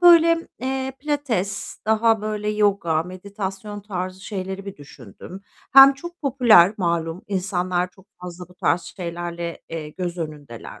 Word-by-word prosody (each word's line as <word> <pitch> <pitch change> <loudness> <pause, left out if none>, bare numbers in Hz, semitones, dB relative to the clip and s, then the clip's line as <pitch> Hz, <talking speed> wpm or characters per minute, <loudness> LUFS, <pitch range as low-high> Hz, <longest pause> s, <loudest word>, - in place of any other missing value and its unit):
böyle, 335 -1 +6
eee, 265 +1 -2
pilates 270 -10 -2
daha 220 0 +3
böyle 210 -1 -3
yoga, 200 -7 +1
meditasyon 195 +2 -6
tarzı 185 -2 -5
şeyleri 190 -1 -5
bir 195 - -7
düşündüm. 145 - -12 0.3
Hem 270 +1 +10
çok 345 +5 -10
popüler, 235 - +5
malum, 170 0 -1
insanlar 185 -2 -1
çok 190 +1 -22
fazla 180 0 -8
bu 180 - -18
tarz 180 -1 +1
şeylerle, 170 -1 -6
eee, 160 -2 -5
göz 175 +2 -5
önündeler. 150 -7 -7
190 Hz, 135 wpm, -23 LUFS, 175-220 Hz, 0.3 s, Hem